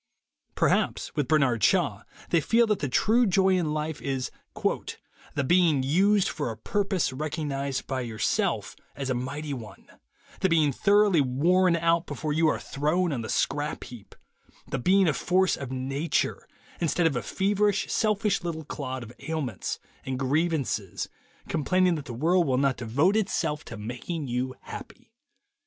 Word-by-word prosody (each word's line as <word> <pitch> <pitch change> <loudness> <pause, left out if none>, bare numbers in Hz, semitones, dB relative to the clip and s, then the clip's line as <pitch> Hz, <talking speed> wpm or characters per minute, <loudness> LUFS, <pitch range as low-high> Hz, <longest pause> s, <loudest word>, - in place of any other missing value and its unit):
Per - - +3
haps, - - 0
with 145 -4 0
Bernard 135 -7 +2
Shaw, - - +2 0.3
they 170 - +4
feel 230 +9 +4
that 210 -3 0
the 145 - -2
true 225 - +3
joy 190 0 +3
in 180 -5 +2
life 155 0 -3
is 135 -2 -2 0.2
"the 145 - -4
being 160 -2 +3
used 195 +8 +3
for 145 -5 -2
a 110 - -6
purpose 195 - 0
recog 155 +3 -3
nized 140 -2 -2
by 130 -1 -2
yourself 110 -3 -1 0.2
as 135 -2 -3
a - - +2
mighty 140 +4 -4
one; 110 -7 -9 0.5
the 190 - +2
being 155 -4 +3
thoroughly 200 +2 +4
worn 170 +8 +3
out 170 0 +1
before 155 -1 -3
you 160 +1 +3
are - - +2
thrown 155 +4 0
on 125 - -2
the 110 - -6
scrap 145 +1 -1
heap; 120 -5 -12 0.5
the 135 - -3
being 190 +7 +4
a 155 - +3
force 185 +7 +2
of 135 -2 -7
Nature 135 +5 -1 0.3
instead 170 +1 +1
of 160 -5 +2
a 125 - 0
feverish, 205 0 0
selfish 210 -2 +1
little 160 -3 -4
clod 130 -3 -5
of 115 +1 -11
ailments 150 - -3 0.3
and 130 -1 -3
grievances, 135 - -1 0.4
complaining 180 +3 +2
that 150 -4 -4
the 125 - -7
world 165 +7 +2
will 130 -1 +2
not 135 -1 +2
devote 140 - +2
itself 165 -8 0
to 115 - -8
making 125 +9 -5
you 125 +1 -2
happy." - - -10
150 Hz, 165 wpm, -27 LUFS, 130-180 Hz, 0.5 s, they